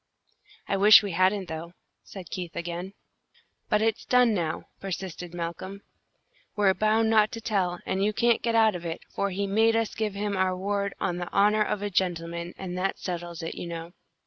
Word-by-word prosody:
"I 195 - 0
wish 210 +2 +8
we 200 - -3
hadn't, 185 +3 +2
though," 165 +1 -6 0.3
said 190 -4 -11
Keith, 180 -3 -5
again. 175 +3 -5 0.8
"But 210 +1 +3
it's 225 0 0
done 250 -2 +4
now," 165 -5 -2 0.2
persisted 185 -2 -5
Malcolm. 175 +3 -6 0.7
"We're 200 -2 +4
bound 215 +3 +2
not 215 -1 +4
to 230 - -4
tell, 195 -6 0
and 190 +1 0
you 210 - +2
can't 235 +2 +2
get 230 -1 0
out 220 -1 +5
of 175 -1 -6
it, 165 -1 -4
for 200 - -1
he 200 +1 -2
made 220 +3 +3
us 225 -1 0
give 215 -3 -2
him 205 0 -2
our 185 -1 +1
word 200 +1 -2
'on 175 -2 -1
the 175 -1 -5
honour 210 +2 +4
of 210 -1 0
a 205 - -2
gentleman;' 170 -1 -2
and 180 -2 -5
that 195 +1 -1
settles 175 -2 -5
it, 165 - -4
you - - -6
know." 170 0 -7
195 Hz, 195 wpm, -27 LUFS, 175-210 Hz, 0.8 s, wish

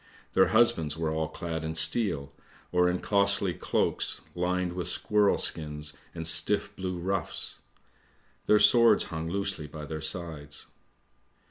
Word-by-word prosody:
Their 95 -1 +5
husbands 80 -7 +2
were 80 -1 -1
all 80 0 -1
clad 80 -1 -5
in 80 0 -4
steel, 80 -3 +1 0.4
or 90 0 +3
in 90 0 -2
costly 100 -2 +1
cloaks - - -1
lined 90 0 -1
with 90 -1 -2
squirrel 105 +2 +2
skins 75 -1 0 0.2
and 80 - -5
stiff 105 +5 +1
blue 90 -1 -4
ruffs; 95 +2 -2 0.9
their 105 - +6
swords 115 +3 +6
hung 80 +1 -4
loosely 95 -4 -2
by 75 0 -8
their 80 +2 -6
sides. 80 -3 -5
90 Hz, 135 wpm, -28 LUFS, 80-100 Hz, 0.9 s, their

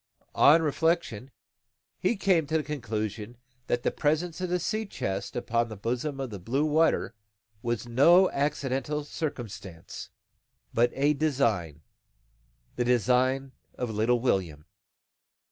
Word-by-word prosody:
On 160 +3 +6
reflection, 155 -6 0 0.7
he 185 - +1
came 185 -6 +2
to 160 +2 +1
the 155 - -1
conclusion 115 -5 -4 0.3
that 120 - 0
the - - +1
presence 160 +3 -1
of 185 - -2
the 180 0 +1
sea 215 +5 -2
chest 95 - -4
upon 115 -1 0
the 110 - -7
bosom 125 +7 -3
of 130 -3 -4
the 100 - -6
blue 130 +11 0
water 155 -5 +2 0.5
was 120 0 -2
no 170 +10 +6
accidental 145 +1 -1
circumstance, 105 - -6 0.6
but 120 +1 +3
a 145 +2 +3
design, 115 - 0 1.0
the 125 - +1
design 125 +3 +2 0.2
of 125 -2 -3
little 110 +3 +2
William. 90 - -1
130 Hz, 130 wpm, -28 LUFS, 115-155 Hz, 1.0 s, On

